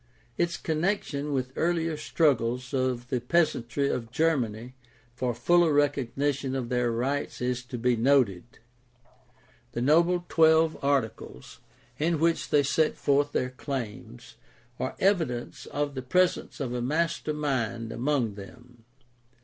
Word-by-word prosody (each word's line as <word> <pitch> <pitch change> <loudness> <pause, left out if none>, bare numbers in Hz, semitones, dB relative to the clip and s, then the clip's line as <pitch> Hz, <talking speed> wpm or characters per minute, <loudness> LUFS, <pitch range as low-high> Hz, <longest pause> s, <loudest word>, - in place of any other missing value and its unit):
Its 170 +4 0
connection 155 -3 -1
with 130 -2 -2
earlier 165 -1 0
struggles 125 -5 0
of 130 -2 -1
the 125 - -1
peasantry 140 -2 +1
of 115 -4 -2
Germany 125 -5 0 0.4
for 125 0 -1
fuller 170 +7 +3
recognition 140 -1 0
of 125 -3 -3
their 125 -1 +1
rights 135 +5 -2
is 125 0 -1
to 125 0 -6
be 120 +1 +2
noted. 120 -3 +1 1.2
The 120 - -2
noble 170 +5 +3
Twelve 160 0 +4
Articles, 120 - -2 0.4
in 165 +2 +1
which 165 +1 +1
they 145 -1 +4
set 155 +3 +1
forth 145 +1 +2
their 125 -2 -1
claims, 125 - -7 0.4
are 130 - -3
evidence 165 -12 0
of 145 0 -2
the 130 - -4
presence 180 +9 +1
of 130 -4 -3
a 125 - -2
master 155 +4 -1
mind 120 -6 -2
among 125 -3 0
them. 120 +4 -13
135 Hz, 130 wpm, -27 LUFS, 120-155 Hz, 1.2 s, Twelve